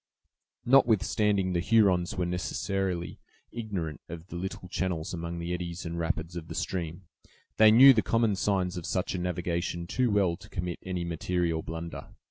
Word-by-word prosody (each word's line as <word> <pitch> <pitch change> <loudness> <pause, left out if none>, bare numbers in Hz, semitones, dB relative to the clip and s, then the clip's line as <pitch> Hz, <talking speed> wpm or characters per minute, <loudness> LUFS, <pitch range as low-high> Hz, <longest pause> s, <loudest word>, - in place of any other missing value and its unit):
Notwithstanding 105 -6 +3
the 85 - +1
Hurons 95 -3 +3
were 90 - 0
necessarily 90 0 -2 0.3
ignorant 95 -10 -4
of 85 +1 -9
the - - -7
little 90 0 -5
channels 90 -3 -2
among 85 0 -4
the 85 +1 -3
eddies 85 0 -5
and 85 0 -4
rapids 85 0 -2
of 85 -2 -6
the - - -7
stream, 85 -1 -3 0.5
they 110 0 +8
knew 130 +5 +9
the 110 - +2
common 115 -1 +1
signs 95 -2 0
of 85 - -5
such 90 - -1
a 95 - -2
navigation 85 -1 -2
too 125 +7 0
well 95 -5 +2
to 105 +2 -15
commit 90 -2 -4
any 90 -2 -3
material 85 0 -1
blunder. 80 +1 -7
90 Hz, 165 wpm, -28 LUFS, 85-100 Hz, 0.5 s, knew